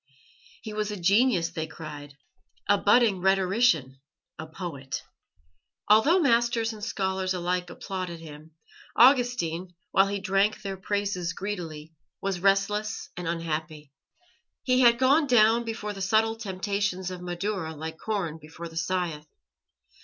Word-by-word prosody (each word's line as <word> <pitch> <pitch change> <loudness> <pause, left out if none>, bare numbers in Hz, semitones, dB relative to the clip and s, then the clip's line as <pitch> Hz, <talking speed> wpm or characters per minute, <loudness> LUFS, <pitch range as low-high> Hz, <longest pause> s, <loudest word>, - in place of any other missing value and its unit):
He 215 - -6
was 210 0 -2
a 205 -2 -5
genius, 195 -2 +3
they 160 -2 -4
cried, 145 -3 -9 0.5
a 205 - +5
budding 205 -1 +3
rhetorician, 190 - +2 0.4
a 160 - -6
poet. 155 -6 -6 0.9
Although 285 - +5
masters 235 -4 +2
and 210 -1 -10
scholars 190 -2 -1
alike 180 0 -2
applauded 185 -3 -5
him, 155 0 -12 0.4
Augustine, 230 - +3 0.2
while 195 +1 +4
he 200 0 -2
drank 200 +2 +1
their 195 -1 -4
praises 190 -2 -2
greedily, 165 -6 -6 0.3
was 195 -2 -2
restless 200 +3 0
and 180 -1 -5
unhappy. 160 -3 -4 0.7
He 255 -1 +2
had 235 -2 +6
gone 280 +5 +4
down 235 -1 +4
before 215 -2 -4
the 195 - -8
subtle 220 +3 +2
temptations 200 -2 -2
of 180 -1 -7
Madaura 175 -2 -3
like 160 +1 -7
corn 185 -8 -3
before 160 +2 -9
the 165 - -10
scythe. 165 -3 -2
190 Hz, 130 wpm, -27 LUFS, 165-215 Hz, 0.9 s, had